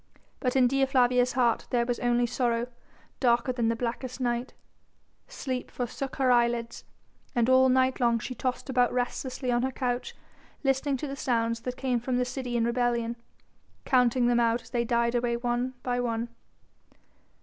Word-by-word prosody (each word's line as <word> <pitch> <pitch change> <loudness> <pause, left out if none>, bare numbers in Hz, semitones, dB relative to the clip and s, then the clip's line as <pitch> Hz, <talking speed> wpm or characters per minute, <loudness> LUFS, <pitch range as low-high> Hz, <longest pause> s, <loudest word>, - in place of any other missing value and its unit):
But 250 -2 -1
in 260 -1 +5
Dea 270 +1 +2
Flavia's 250 -1 +3
heart 240 -3 +1
there 240 -2 +1
was 240 -1 -2 0.3
sorrow 235 -2 +1 0.5
darker 240 0 +2
than 240 -2 0
the 230 - +1
blackest 245 +2 -4
night, 245 0 -2 0.7
sleep 260 - -4
forsook 260 +2 -4
her 260 -2 +2
eyelids, 235 -1 +1 0.5
and 240 -1 +2
all 260 0 +5
night 260 0 +2
long 235 -2 +3
she 240 +3 -5
tossed 255 0 -3
about 250 -2 +2
restlessly 250 +1 -2
on 240 0 +2
her 260 - 0
couch 245 -1 -3 0.5
listening 270 0 +1
to 295 - -4
the 275 - -5
sounds 230 -3 0
that 250 +2 -5
came 255 -3 0
from 245 +1 -1
the 250 - +1
city 250 -1 -3
in 230 - +2
rebellion, 235 -1 0 0.7
counting 250 -1 +3
them 240 0 +3
out 235 0 +2
as - - -16
they 240 -1 +1
died 235 0 +1
away 240 -1 0
one 245 +1 -2
by 245 -1 -1
one. 235 -1 -2
245 Hz, 170 wpm, -28 LUFS, 235-255 Hz, 0.7 s, in